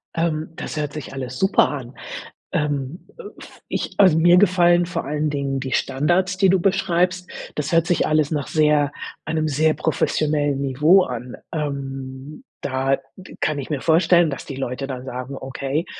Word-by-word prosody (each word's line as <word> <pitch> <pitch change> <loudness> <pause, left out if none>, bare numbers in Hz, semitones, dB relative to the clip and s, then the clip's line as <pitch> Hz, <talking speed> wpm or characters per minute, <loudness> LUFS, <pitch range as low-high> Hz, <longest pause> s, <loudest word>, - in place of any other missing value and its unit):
Ähm, 160 -1 -1
das - - -6
hört 150 -1 -2
sich 150 -3 -7
alles 130 -2 -5
super 190 +1 +4
an. 130 -3 -6 0.6
Ähm, 145 +1 -2
äh, 480 - -10 0.2
v - - -14
ich - - -3
also, 185 -6 +6
mir 175 +2 +6
gefallen 175 -2 +4
vor 180 - -4
allen 150 +1 -1
Dingen 140 -2 -2
die 130 -1 -5
Standards, 175 +8 +1
die 190 -1 +4
du 190 0 +4
beschreibst. 180 -1 +1 0.3
Das 150 +1 -3
hört 165 0 +3
sich 175 - +2
alles 155 0 +2
nach 145 -3 -2
sehr 150 -2 +3 0.3
einem 155 -1 -1
sehr 155 +2 +2
professionellen 145 -3 0
Niveau 150 +8 +4
an. 125 -2 -6 0.2
Ähm, 140 - -5 0.2
da 135 0 0 0.4
kann 150 -2 0
ich 135 - -6
mir 145 -4 -2
vorstellen, 170 0 +4
dass 135 - -6
die 135 - -7
Leute 135 0 -4
dann 130 -1 -6
sagen: 130 +1 -6
„Okay“, 135 +4 -3
150 Hz, 170 wpm, -22 LUFS, 135-170 Hz, 0.6 s, also